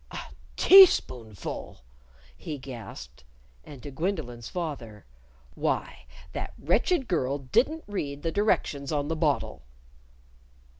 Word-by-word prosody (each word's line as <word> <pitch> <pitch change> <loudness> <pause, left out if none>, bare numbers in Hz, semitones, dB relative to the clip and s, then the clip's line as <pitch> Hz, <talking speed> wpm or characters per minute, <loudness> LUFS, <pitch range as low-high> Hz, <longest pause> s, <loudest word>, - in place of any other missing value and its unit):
"A - - -7 0.4
teaspoonful!" 125 - +4 0.5
he 155 -2 -6
gasped. 125 - -10 0.4
And 140 -4 -12
to 145 - -7
Gwendolyn's 140 - -3
father, 135 - -6 0.5
"Why, - - -3 0.3
that - - -5
wretched 250 - +1
girl 140 -6 0
didn't 250 - +1
read 145 -8 -4
the 165 - -1
directions 150 -9 0
on 145 -1 -1
the 165 - 0
bottle!" 155 -3 0
145 Hz, 105 wpm, -27 LUFS, 130-180 Hz, 0.5 s, teaspoonful